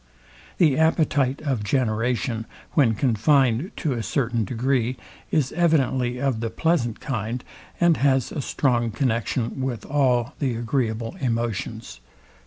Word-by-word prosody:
The 155 -5 +4
appetite 155 -4 +2
of 130 -8 -1
generation, 115 0 0 0.2
when 120 -7 +3
confined 130 - +2
to 155 -6 -1
a 120 - -2
certain 115 -1 0
degree, 125 +2 0 0.3
is 140 -4 +1
evidently 130 -7 +1
of 135 -4 0
the 115 0 -2
pleasant 120 -2 0
kind, 120 -1 -3 0.4
and 170 -2 +4
has 135 -3 +2
a 145 - -3
strong 120 -3 +1
connexion 115 +1 -1
with, 130 -3 -3
all 130 -2 +1
the 130 -5 0
agreeable 115 +2 -2
emotions. 115 - -3
125 Hz, 125 wpm, -24 LUFS, 115-140 Hz, 0.4 s, The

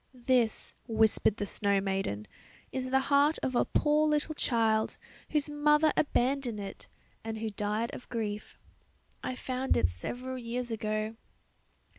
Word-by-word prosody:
"This," 245 -4 +2
whispered 220 -2 +3
the 205 - -1
snow 200 0 +2
maiden, 190 - -2 0.5
"is 255 -1 -2
the 265 +1 +3
heart 285 +3 +3
of 260 - -1
a - - +3
poor 300 +1 +3
little 300 +1 +1
child, 225 -6 +1 0.3
whose 300 -1 +1
mother 300 +1 +3
abandoned 255 -5 +1
it, 195 -1 -7 0.4
and 225 0 -4
who 220 0 -3
died 210 +3 -1
of - - -9
grief. 215 -3 -4 0.7
I 255 - -2
found 255 +1 0
it 85 - +3
several 250 - -5
years 240 0 -3
ago. 215 0 -2
235 Hz, 140 wpm, -30 LUFS, 215-265 Hz, 0.7 s, whispered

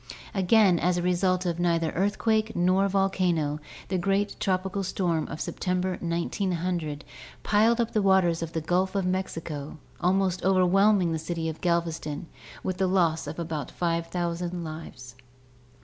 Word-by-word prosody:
Again, 195 -2 +4
as 180 +2 +1
a 175 - -1
result 180 +1 +1
of 170 -1 -1
neither 165 -2 +1
earthquake 215 +3 0
nor 185 +3 +3
volcano, 180 -6 +1 0.3
the 185 - 0
great 195 +2 0
tropical 190 +1 -1
storm 175 -4 -1
of 155 - -7
Sep - - -5
tember, 185 0 -1
1900, 170 -3 -2 0.4
piled 225 +3 +3
up 230 -1 0
the 215 - +1
waters 190 -4 +3
of 165 -1 -5
the 160 - -1
Gulf 185 +4 0
of 195 -2 +1
Mexico, 165 -6 -3 0.2
almost 185 0 +1
overwhelming 190 0 +4
the 160 - -1
city 165 0 -3
of 160 - -7
Galveston, 165 -3 -1 0.4
with 185 0 -3
a 190 - +3
loss 170 -5 +1
of 150 - -6
about 155 -5 -4
5,000 170 +1 -2
lives. 155 -6 -8
180 Hz, 150 wpm, -27 LUFS, 165-190 Hz, 0.4 s, Again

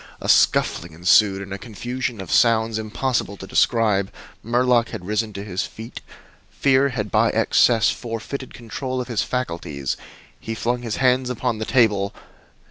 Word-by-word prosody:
A - - -6
scuffling 85 -1 +3
ensued, 95 +4 +3
and 100 0 -8
a 100 - -6
confusion 120 +1 -4
of 95 - -8
sounds 110 -1 +3
impossible 110 -1 -2
to 95 - -9
describe. 105 -2 +2 0.3
Murlock 120 0 +2
had 90 - -7
risen 105 +2 -1
to 100 - -6
his 95 -2 -3
feet. 115 +2 -10 0.5
Fear 135 0 +2
had 105 -6 -4
by - - +3
excess 115 -3 +3
forfeited 120 +3 -6
control 130 +2 -5
of 125 - -5
his 110 -3 0
faculties. 85 - -3 0.4
He 115 - -5
flung 120 +2 -1
his 115 -3 -3
hands 130 -1 +2
upon 125 -2 -2
the 110 - -3
table. 105 -6 +2
115 Hz, 155 wpm, -22 LUFS, 100-125 Hz, 0.5 s, scuffling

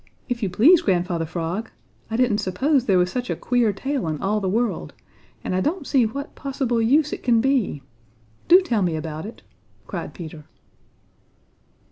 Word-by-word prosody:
If 245 -2 -3
you 200 - 0
please, 285 - +5
Grandfather 175 -3 0
Frog! 175 +6 -3 0.4
I 225 - -2
didn't 240 -4 +2
suppose 260 - +1
there 195 -5 +3
was 180 0 +2
such 250 -1 -3
a - - 0
queer 240 -3 +1
tail 265 - -3
in 155 -2 -2
all 210 +2 0
the 190 - -1
world, 230 +4 -1 0.5
and - - -3
I 185 - +1
don't 315 - -1
see 255 -5 +3
what 280 +6 -6
possible 265 -4 -1
use 290 +6 +3
it - - -5
can 235 -2 +3
be. 240 - 0 0.6
Do 360 +2 +8
tell 240 - 0
me 175 -3 0
about 155 +3 -5
it!" 230 - -12 0.4
cried - - -6
Peter. 160 -4 -9
225 Hz, 175 wpm, -23 LUFS, 180-265 Hz, 0.6 s, Do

